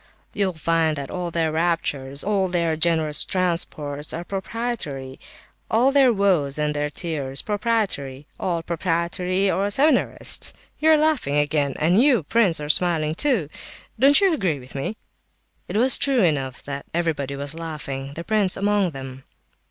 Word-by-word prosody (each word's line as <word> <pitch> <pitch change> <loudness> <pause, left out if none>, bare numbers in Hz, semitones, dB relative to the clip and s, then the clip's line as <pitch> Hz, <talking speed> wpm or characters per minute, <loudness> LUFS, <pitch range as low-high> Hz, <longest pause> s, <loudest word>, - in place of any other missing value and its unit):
You'll 195 -3 0
find 160 -1 0
that 140 -1 -6
all 180 -1 -3
their 165 -1 0
raptures, 150 -4 -1
all 195 -2 +1
their 170 -3 0
generous 160 -2 +1
transports 155 -5 -2
are 170 - -4
proprietary, 190 - -4 0.5
all 245 +5 +3
their 270 -3 +5
woes 185 -10 +1
and 150 0 0
their 150 0 -2
tears, 145 -4 -3
proprietary; 205 - -1
all 170 -3 -2
proprietary 180 +3 -1
or 195 +4 0
seminarist! 285 +9 +1 0.2
You 315 - +3
are 315 - +7
laughing 300 - +1
again, 145 -2 +1
and 175 +8 +3
you, 255 - +4
prince, 190 -1 +2
are 150 - -5
smiling 155 -1 +2
too. 230 - +1 0.5
Don't 275 +3 +7
you 390 -3 +3
agree 185 - 0
with 130 -1 -12
me?" 140 +11 -4 0.7
It - - -3
was 255 +3 +6
true 265 -5 +2
enough 135 -6 -1
that 140 0 -6
everybody 150 -5 -1
was 140 +1 -3
laughing, 145 -4 -6
the 170 - -5
prince 205 -2 +1
among 205 -1 +1
them. 130 0 -9
170 Hz, 150 wpm, -23 LUFS, 145-200 Hz, 0.7 s, are